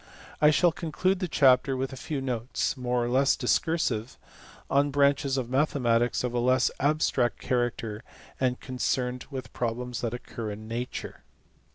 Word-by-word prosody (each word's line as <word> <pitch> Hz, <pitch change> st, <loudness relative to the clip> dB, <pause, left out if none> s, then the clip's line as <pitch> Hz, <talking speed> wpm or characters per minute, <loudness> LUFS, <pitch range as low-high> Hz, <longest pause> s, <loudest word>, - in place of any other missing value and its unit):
I 150 Hz, -, +7 dB
shall 170 Hz, +3 st, +4 dB
conclude 180 Hz, +4 st, -1 dB
the 185 Hz, -, -1 dB
chapter 135 Hz, -3 st, +4 dB
with 135 Hz, +1 st, -3 dB
a -, -, -5 dB
few 135 Hz, +2 st, -4 dB
notes 125 Hz, 0 st, -2 dB
more 125 Hz, -2 st, -1 dB
or -, -, -2 dB
less 130 Hz, +3 st, +3 dB
discursive 130 Hz, -3 st, 0 dB, 0.5 s
on 140 Hz, +1 st, +2 dB
branches 140 Hz, -1 st, +2 dB
of 130 Hz, -3 st, -2 dB
mathematics 125 Hz, -4 st, +1 dB
of 125 Hz, -1 st, -2 dB
a 120 Hz, -, +1 dB
less 130 Hz, +1 st, +3 dB
abstract 140 Hz, -4 st, +1 dB
character 120 Hz, -3 st, -2 dB, 0.4 s
and 125 Hz, -1 st, 0 dB
concerned 125 Hz, -1 st, -2 dB
with 135 Hz, -2 st, -7 dB
problems 120 Hz, +1 st, -3 dB
that 120 Hz, 0 st, -2 dB
occur 115 Hz, -2 st, -6 dB
in 105 Hz, +1 st, -7 dB
nature. 120 Hz, +2 st, -5 dB
125 Hz, 155 wpm, -27 LUFS, 120-140 Hz, 0.5 s, I